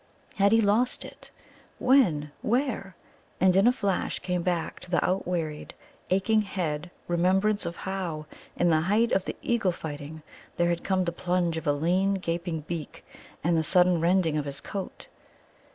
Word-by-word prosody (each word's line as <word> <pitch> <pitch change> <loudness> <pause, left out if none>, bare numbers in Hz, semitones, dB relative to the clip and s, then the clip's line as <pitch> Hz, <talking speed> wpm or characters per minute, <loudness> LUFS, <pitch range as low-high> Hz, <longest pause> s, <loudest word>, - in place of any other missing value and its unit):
How 200 - +3
had 200 - +5
he 225 - +5
lost 220 +4 +1
it? - - -13 0.5
When? 175 - +3
Where? 235 -6 -1 0.4
And 185 -1 +4
in 195 +4 +5
a - - +7
flash 200 -6 -1
came 180 -1 -2
back 170 -2 -2
to - - -11
his 175 - +2
outwearied, 175 -5 -2 0.4
aching 205 +4 +3
head 175 -5 -3 0.2
remembrance 190 +3 +2
of 170 - -5
how, 180 -6 -4 0.3
in 175 -1 +2
the 155 -1 +3
height 210 +7 +2
of 190 - +1
the - - -4
eagle 225 -6 +1
fighting, 155 -1 -7 0.3
there 175 0 +2
had 170 0 -1
come 190 -1 +1
the 170 - 0
plunge 175 -1 0
of 160 -1 -5
a 145 - +4
lean, 180 +6 +1
gaping 170 -3 -3
beak 160 -1 -7 0.4
and 170 +2 +2
the 160 - +2
sudden 180 0 +4
rending 170 -2 +2
of 145 - -3
his 140 -1 -4
coat. 195 -2 -6
180 Hz, 170 wpm, -27 LUFS, 165-195 Hz, 0.5 s, a